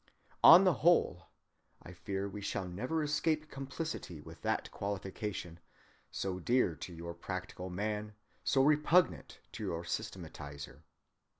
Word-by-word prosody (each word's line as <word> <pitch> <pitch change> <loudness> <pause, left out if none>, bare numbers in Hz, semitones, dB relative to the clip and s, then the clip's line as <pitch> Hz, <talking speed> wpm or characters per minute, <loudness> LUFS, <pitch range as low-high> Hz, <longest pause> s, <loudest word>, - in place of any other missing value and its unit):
"On 170 +4 +11
the 185 -2 +5
whole,"—I 95 - -1
fear 95 +3 -3
we 100 +1 -7
shall 95 -1 -2
never 125 - -2
escape 155 +1 0
complicity 135 - -5
with - - -12
that - - -1
qualification, 95 -3 -4 0.5
so 95 -1 -3
dear 120 -2 +2
to - - -7
your 85 0 -6
practical 95 +1 -6
man, 105 +3 -3 0.3
so 135 -2 +3
repugnant 150 +4 +3
to - - -6
your 85 0 -2
systematizer! 75 -8 -6
100 Hz, 120 wpm, -33 LUFS, 90-135 Hz, 0.5 s, On